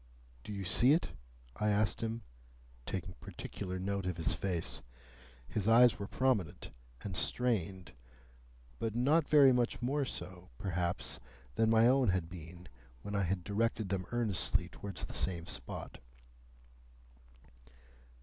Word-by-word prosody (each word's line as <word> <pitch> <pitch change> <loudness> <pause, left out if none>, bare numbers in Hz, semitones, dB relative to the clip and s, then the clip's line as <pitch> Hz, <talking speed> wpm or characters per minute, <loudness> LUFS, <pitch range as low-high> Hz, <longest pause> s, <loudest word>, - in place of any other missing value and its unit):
"Do - - -7
you 100 -2 -4
see 120 +9 +5
it?" 165 - +1 0.5
I 105 - +1
asked 105 0 +2
him, 115 0 -3 0.6
taking 90 -2 -3
particular 95 -2 -6
note 95 0 -2
of 90 -2 -2
his 80 -2 +1
face. 90 -1 -2 0.7
His 100 - -2
eyes 120 0 +6
were 100 - -4
prominent 115 - 0 0.3
and 95 -3 -4
strained, 95 -8 -1 0.9
but 110 -1 -2
not 145 +6 +3
very 140 -4 +7
much 125 -1 +1
more 135 +3 0
so, 90 -5 -7
perhaps, 90 0 -2 0.3
than 110 0 +3
my 115 +1 +6
own 130 0 +4
had 90 -3 +1
been 85 +1 -10 0.4
when 105 - -5
I 100 - +1
had 90 0 0
directed 110 +1 0
them 95 -2 -2
earnestly 95 -6 +1
towards 100 +2 -6
the - - -9
same 85 -3 -1
spot. - - -7
100 Hz, 135 wpm, -34 LUFS, 90-115 Hz, 0.9 s, very